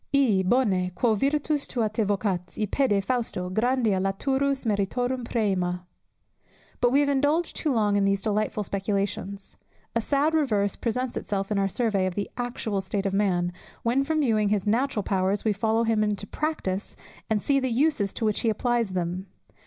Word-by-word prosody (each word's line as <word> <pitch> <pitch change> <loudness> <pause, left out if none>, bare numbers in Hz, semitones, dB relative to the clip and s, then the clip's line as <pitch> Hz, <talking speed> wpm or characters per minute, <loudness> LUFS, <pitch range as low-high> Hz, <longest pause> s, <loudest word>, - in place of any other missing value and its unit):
"I, 235 -9 +4
bone, 190 -4 +2
quo 235 +1 +2
virtus 290 +5 0
tua 230 -3 0
te 215 +2 -2
vocat, 195 -3 -1
i 215 - +2
pede 205 -3 +1
fausto, 225 -7 -1
Grandia 225 -1 +2
laturus 265 +8 0
meritorum 245 +5 0
præmia." 190 -6 0 1.0
But 245 - +3
we 280 +2 +4
have 285 - +2
indulged 290 +5 +1
too 305 - 0
long 210 -4 +2
in 200 - +3
these 195 0 +1
delightful 215 0 0
speculations; 200 0 -2 0.4
a 230 - +2
sad 285 +6 +1
reverse 215 -11 +1
presents 250 +1 -2
itself 195 0 -2
on 205 - +1
our 195 0 +1
survey 200 -3 +1
of 180 - -4
the 205 - -3
actual 235 -5 -2
state 195 +1 -3
of 195 - 0
man, 180 -3 +1 0.3
when, 245 +4 +2
from 310 +2 0
viewing 215 -6 +2
his 205 -2 0
natural 225 0 +1
powers, 190 +2 0
we 215 - +3
follow 220 +3 +1
him 225 -2 +2
into 205 -1 -1
practice, 205 -8 -3 0.3
and 220 -1 +2
see 275 +6 +2
the 260 -1 -1
uses 245 -5 +1
to 225 - -1
which 215 -1 +1
he 230 - +1
applies 230 -2 0
them. 180 +1 -2
215 Hz, 175 wpm, -26 LUFS, 195-255 Hz, 1.0 s, I